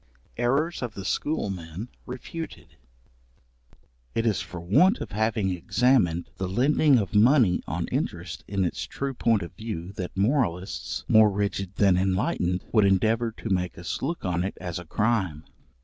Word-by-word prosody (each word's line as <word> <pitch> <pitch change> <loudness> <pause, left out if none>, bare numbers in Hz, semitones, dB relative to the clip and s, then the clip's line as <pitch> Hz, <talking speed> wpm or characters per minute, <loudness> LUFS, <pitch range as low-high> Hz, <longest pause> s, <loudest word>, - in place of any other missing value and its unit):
Errors 140 +8 +1
of 120 -4 -4
the 95 - -6
schoolmen 95 - -2 0.2
refuted. 160 +6 -7 1.4
It 115 - +1
is 110 -4 +1
for 90 - -7
want 115 - +4
of 110 - -6
having 110 -1 0
examined 90 -2 +2
the 95 -1 -3
lending 140 +6 +4
of 105 -2 -1
money 110 -3 +5
on - - -2
interest 85 -1 -3
in 100 -2 0
its 85 - -3
true 140 0 -3
point 115 -5 +2
of 85 - -9
view 95 -4 -6
that 90 +1 -5
moralists, 100 - -1
more 110 -1 +6
rigid 100 -1 -2
than 95 -3 +4
enlightened, 95 -1 0
would 110 -3 +4
endeavour 110 +4 +2
to 115 - -7
make 90 -2 -1
us 85 0 -4
look 160 0 -3
on 90 -1 0
it 95 - -4
as 90 -1 -4
a 90 - -9
crime. 95 -6 0
100 Hz, 155 wpm, -26 LUFS, 90-120 Hz, 1.4 s, more